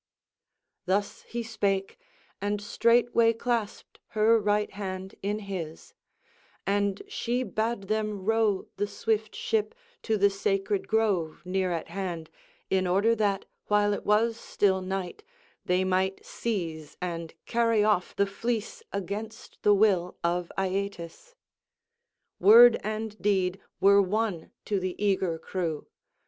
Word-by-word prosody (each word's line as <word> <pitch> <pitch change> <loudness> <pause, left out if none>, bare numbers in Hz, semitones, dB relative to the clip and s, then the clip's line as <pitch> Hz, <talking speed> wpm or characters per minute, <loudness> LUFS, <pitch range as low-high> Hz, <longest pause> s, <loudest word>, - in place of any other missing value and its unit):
Thus 200 +2 0
he 235 0 -4
spake, 200 -4 -1 0.4
and 205 +1 -1
straightway 230 +2 +3
clasped 230 -2 -3 0.2
her 225 +2 +5
right 210 0 +1
hand 190 -1 -5
in 205 +2 -1
his; 170 -5 -6 0.7
and 200 0 0
she 245 +2 -1
bade 225 -3 -2
them 210 -1 -2
row 220 -3 +2
the 205 +1 0
swift 220 - -1
ship 455 0 -1 0.3
to 220 -1 0
the 200 0 +4
sacred 195 0 -1
grove 200 -8 0
near 185 0 0
at 165 -2 -3
hand, 175 -5 -5 0.4
in 185 -1 +1
order 200 +6 +3
that, 205 -2 0 0.2
while 205 0 +3
it - - -4
was 225 +2 +2
still 190 -4 +1
night, 190 - -4 0.4
they 180 +1 +2
might 190 +1 0
seize 165 -9 -4
and 170 -2 -5
carry 230 -2 +2
off 210 -4 +1
the 200 - +3
fleece 225 +2 -3
against 210 +4 -6
the 205 0 +5
will 190 -4 +2
of 175 0 0
Aeetes. 195 - -3 1.0
Word 230 +5 +9
and 215 0 -4
deed 190 -2 +1 0.2
were 200 +1 +6
one 200 -3 -1 0.2
to 205 -2 0
the 185 -1 -3
eager 190 -4 +1
crew. 165 -3 -3
200 Hz, 130 wpm, -28 LUFS, 185-220 Hz, 1.0 s, Word